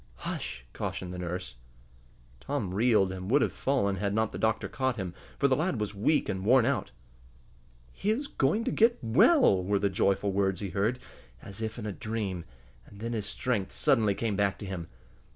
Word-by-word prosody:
"Hush!" - - -5
cautioned 90 -1 -4
the 90 - -6
nurse. 90 -7 -5 0.8
Tom 120 - -3
reeled, 105 -3 +3
and 95 0 -6
would 140 +4 +4
have - - -1
fallen 100 -8 0
had 100 +1 -1
not 110 0 +1
the - - -6
doctor 110 0 +1
caught 130 -2 -1
him, 95 -5 -4 0.2
for 140 - +3
the 130 - +3
lad 155 -4 0
was 105 -1 -2
weak 110 +10 +1
and 95 -1 -3
worn 120 +3 +5
out. 130 -6 0 1.0
"He 200 - -3
is 245 +7 +1
going 205 - +1
to - - -1
get 230 +2 +4
well!" 115 - +5
were 100 +2 +1
the 100 0 +1
joyful 100 +1 +1
words 95 -2 +1
he 100 - -4
heard, 105 +7 +1 0.5
as 100 +2 -9
if 110 +1 -3
in 110 - -5
a 105 - -2
dream, 100 -4 -4 0.4
and 100 - -14
then 115 +2 -3
his 105 -3 -3
strength 100 -1 -2
suddenly 110 -6 +3
came 110 -2 -1
back 100 -1 +1
to - - -7
him. 90 -3 -5
105 Hz, 195 wpm, -29 LUFS, 95-125 Hz, 1.0 s, worn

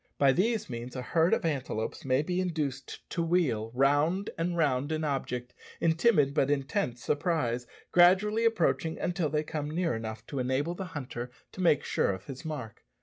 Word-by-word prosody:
By 140 -1 +5
these 220 - +1
means 120 +1 -6
a 125 - -4
herd 165 +5 +2
of - - +2
antelopes 135 -7 -2
may 130 +2 +2
be 180 +3 -1
induced 150 -7 -3
to 170 - -1
wheel 160 -11 +1
round 145 +9 +2
and 170 +1 -1
round 145 -2 +1
an 155 0 -1
object 125 -4 -2 0.3
in 165 - +3
timid 160 -6 +3
but 140 -2 +2
intense 135 - -1
surprise, 130 -7 0 0.2
gradually 195 +6 +5
approaching 175 -7 +1
until 175 -3 -1
they 150 0 0
come 150 -1 -4
near 165 0 0
enough 110 0 -6
to 140 - -4
enable 130 +6 0
the 190 +2 -5
hunter 125 -3 -5 0.2
to 185 - -7
make 150 -5 +4
sure - - +1
of 95 +1 -8
his 135 -2 -8
mark. 145 -9 -6
150 Hz, 180 wpm, -29 LUFS, 130-170 Hz, 0.3 s, By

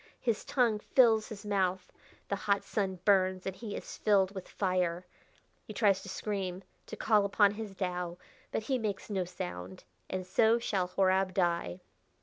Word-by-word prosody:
His 230 -4 0
tongue 235 -6 +2
fills 225 -1 +4
his 210 -2 -8
mouth. 190 -2 0 0.4
The 200 - 0
hot 200 0 0
sun 195 -3 -2
burns, 185 -2 +3
and 190 - -3
he 215 -2 -6
is - - -7
filled 200 -2 +3
with 190 -2 -7
fire. 180 -2 0 0.6
He 215 - -8
tries 195 -4 +3
to 195 - -9
scream 190 -2 -3 0.2
to - - -6
call 210 -2 +3
upon 200 0 +4
his 210 -1 -7
Tao 180 -2 -3 0.3
but - - -2
he 260 +2 0
makes 210 -1 -3
no 190 -3 0
sound.... 90 - -7 0.3
And 185 -1 -3
so 220 +5 +4
shall 195 -6 -1
Horab 190 0 +2
die." 170 - 0
195 Hz, 165 wpm, -31 LUFS, 185-210 Hz, 0.6 s, fills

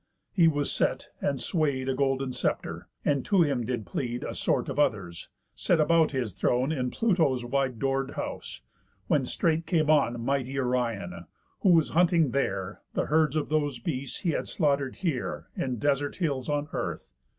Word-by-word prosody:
He 170 -5 +5
was 145 -2 +1
set, - - 0
and 140 -2 0
sway'd 140 -4 0
A 135 - +1
golden 135 -1 0
sceptre; - - -2 0.2
and 140 -3 +2
to 195 -4 +4
him 140 -6 0
did 115 -2 -3
plead 120 +7 -3
A - - -4
sort - - 0
of - - -3
others, 95 - 0 0.2
set 170 - +1
about 160 0 +4
his 125 -8 -2
throne, 125 +4 +1
In 130 -5 -1
Pluto's 160 - +1
wide 130 -1 0
door'd 135 +1 -1
house; - - -5 0.4
when - - +2
straight 165 0 0
came 155 -4 +3
on 120 -6 +3
Mighty 135 +2 -1
Orion, 115 -10 -2 0.3
who 195 - +3
was 165 -3 +5
hunting 170 -4 +3
there 100 -7 -2
The - - +1
herds 155 -1 +2
of 155 - -1
those 145 -4 0
beasts 130 +1 -4
he 175 - +1
had - - -2
slaughter'd 140 -5 0
here 160 -10 -3
In 130 -2 -1
desert 145 +3 0
hills 140 -7 -1
on 145 0 0
earth. - - -3
140 Hz, 175 wpm, -28 LUFS, 125-155 Hz, 0.4 s, He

